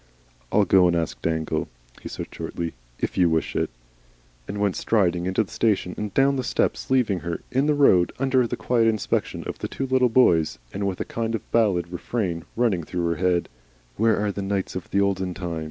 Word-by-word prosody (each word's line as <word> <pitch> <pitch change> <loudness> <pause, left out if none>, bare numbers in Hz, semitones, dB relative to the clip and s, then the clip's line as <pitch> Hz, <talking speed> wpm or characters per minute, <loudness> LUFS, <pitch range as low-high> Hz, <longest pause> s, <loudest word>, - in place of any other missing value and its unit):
"I'll 105 - +4
go 90 -1 +5
and 85 - +2
ask 85 -1 -2
Dangle," 80 -1 -1 0.3
he - - -7
said, - - -5
shortly. 85 -1 -5 0.3
"If - - -2
you 90 -2 +5
wish 80 0 -1
it." - - 0 0.8
And 100 - -5
went 100 -2 +1
striding 90 -5 +1
into 95 +4 +1
the 95 - -14
station 100 -5 +1
and 105 -1 -4
down 135 0 +4
the 130 - -1
steps, 120 - -1
leaving 125 -8 +2
her 85 +1 -4
in 135 +3 +2
the 150 - +3
road 95 -12 +5
under 130 -2 +2
the - - -4
quiet 115 -2 +2
inspection 110 -2 -1
of - - -6
the - - -3
two 135 - -4
little 130 -1 +3
boys, 85 - +3 0.2
and 100 0 -2
with 95 -2 -3
a - - -2
kind 115 0 -2
of - - -8
ballad 95 -7 +2
refrain 90 -3 -2
running 110 -8 +1
through 85 +1 -2
her 85 - -1
head, 90 0 +1 0.5
"Where 110 0 +3
are 105 0 0
the 100 - -5
Knights 95 -1 -2
of 95 - -5
the 100 - +1
Olden 95 -2 0
Time?" 85 -3 -4
100 Hz, 210 wpm, -24 LUFS, 85-115 Hz, 0.8 s, go